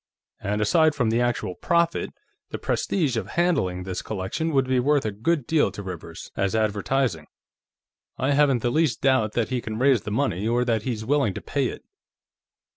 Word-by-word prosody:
And, 105 +1 -2
aside 155 +6 +3
from 125 -6 +1
the 115 +2 +2
actual 120 -6 -1
profit, 170 - +1 0.4
the - - -4
prestige 155 -10 0
of - - -3
handling 95 - +1
this 90 -1 -4
collection 110 - -3
would 135 -3 +2
be 130 -1 +2
worth 145 +1 +2
a 110 - 0
good 130 +8 0
deal 155 -6 +2
to 100 - -7
Rivers, 85 -3 -8
as 100 +2 0
advertising. 110 - 0 0.9
I 130 +2 0
haven't 140 -4 +3
the 120 - +1
least 150 -6 +1
doubt 130 -6 +2
that 115 -2 0
he 130 -2 -1
can 110 -1 -5
raise 130 -2 +3
the - - -6
money, 105 -4 0
or 120 +2 +1
that 115 -3 +1
he's 110 -2 -4
willing 140 -6 +1
to - - -5
pay - - -1
it." - - -7
120 Hz, 190 wpm, -24 LUFS, 105-140 Hz, 0.9 s, aside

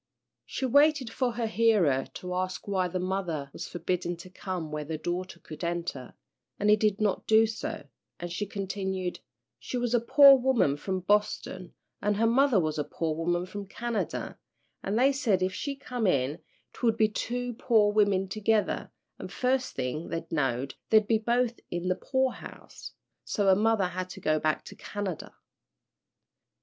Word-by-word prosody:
She 270 - -3
waited 285 -1 +4
for 250 -3 0
her 230 +1 -2
hearer 210 - +3
to 180 0 -5
ask 185 +2 -3
why 190 -2 +1
the 180 - -3
mother 175 -6 -2
was - - -6
forbidden 175 0 -2
to 180 +2 -12
come 185 -4 -5
where 150 0 -3
the 155 +1 -4
daughter 175 +2 -4
could 155 +1 -10
enter, 170 -7 -4 0.4
but 205 - +1
he 210 - +8
did 210 -1 +1
not 210 -3 0
do 220 0 +6
so, 220 0 -5 0.3
and 175 0 -5
she 205 +4 -3
continued, 190 -2 -3 0.4
"She 250 - -4
was 245 -1 -1
a 240 - +5
poor 275 +4 +8
woman 245 - +2
from 185 +5 -3
Boston, 195 -2 -1 0.3
an' 205 0 +1
her 225 +3 +2
mother 250 -1 +4
was 155 -2 -1
a - - +1
poor 160 +2 -2
woman 175 +2 0
from 200 +2 -7
Canada, 235 +2 -3 0.4
an' 195 - -2
they 260 +4 +4
said 225 -9 +1
if 185 0 0
she 280 +7 -3
come 250 -5 -2
in 140 0 +1 0.3
'twould 225 -2 +1
be 220 -2 +4
two 245 +3 -3
poor 220 -3 +3
women 200 -2 +3
together, 215 +2 0 0.3
an' - - -6
first 255 0 -1
thing 135 +5 -3
they 165 0 -4
knowed 135 -3 -1 0.2
they'd 215 -1 +5
be 220 0 +2
both 240 +1 0
in 175 +1 -2
the 185 - +2
poorhouse. 260 +5 -4 0.3
So 205 - -1
her 190 -1 +6
mother 215 -1 +2
had 185 0 -4
to - - -9
go 155 0 +1
back 155 0 0
to - - -10
Canada." 200 -6 -5
195 Hz, 175 wpm, -28 LUFS, 175-225 Hz, 0.4 s, he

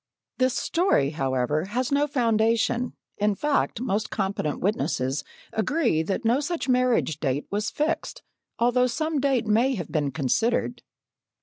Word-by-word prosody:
This 255 0 +2
story, 330 - +2
however, 135 +1 0
has 245 +6 -2
no 285 +1 +2
foundation; 230 -1 +1 0.3
in 210 0 +2
fact, 295 +1 0
most 215 -3 -1
competent 195 -6 -2
witnesses 145 -8 -1 0.3
agree 235 - +1
that 195 +8 -3
no 235 +4 +3
such 330 +2 -3
marriage 250 - +2
date 140 -1 -1
was 205 +2 -1
fixed, 315 +2 -2 0.3
although 245 +2 +3
some 310 +4 -1
date 265 -4 +1
may 235 +5 +2
have 175 -7 -6
been 150 -3 0
considered. 220 - 0
225 Hz, 135 wpm, -25 LUFS, 160-255 Hz, 0.3 s, no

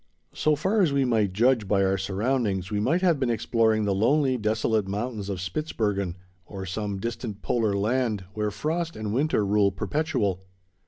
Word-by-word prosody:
So 155 0 +2
far 190 +8 +1
as 170 -6 +3
we 140 -1 +2
might 110 -5 +2
judge 115 +1 +2
by 100 0 +2
our 95 0 +2
surroundings, 100 0 -1
we 105 - 0
might 155 - +1
have 170 -6 +3
been 130 -3 0
exploring 110 -2 +1
the 100 - +1
lonely, 130 +6 +2
desolate 110 -2 0
mountains 105 0 -3
of 95 -3 -3
Spitzbergen, 100 - -2 0.3
or 95 +1 -7
some 100 +1 -3
distant 115 -1 -5
polar 110 -4 +1
land, 110 0 0
where 105 0 -1
frost 160 +10 -2
and 105 -1 -4
winter 135 -4 +1
rule 100 0 +3
perpetual. 105 - -1
110 Hz, 170 wpm, -26 LUFS, 100-130 Hz, 0.3 s, as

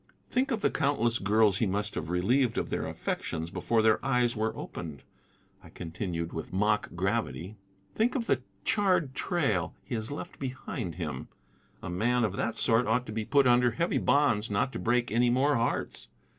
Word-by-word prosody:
"Think 255 +2 +1
of 230 -5 -1
the - - +2
countless 130 -6 +1
girls 105 0 +3
he 110 - +1
must 105 +2 -1
have 80 - -4
relieved 115 +8 +2
of - - -2
their - - -1
affections 80 +1 -3
before 115 +2 +1
their 110 -1 +3
eyes 125 -3 +2
were 110 +1 -1
opened," 75 -4 -7 0.6
I - - -13
continued 85 0 -4
with - - -5
mock 105 +3 +1
gravity. 95 0 -2 0.4
"Think 235 +4 +1
of 240 -4 -1
the 130 - +1 0.2
charred 185 -9 +2
trail 135 - 0
he - - -7
has 110 -1 -2
left 145 - -7
behind 125 - -4
him. 75 -7 -4 0.6
A - - -4
man 120 +7 +1
of 100 -3 0
that 110 +2 -1
sort 115 +1 +2
ought 125 +3 +1
to - - -7
be 110 0 -3
put 140 +3 +4
under 125 0 +5
heavy 170 +9 0
bonds 130 -7 +2
not 105 +6 0
to - - -4
break 120 0 +1
any 120 +2 +3
more 135 +4 +3
hearts. 115 - -2
115 Hz, 185 wpm, -29 LUFS, 100-130 Hz, 0.6 s, under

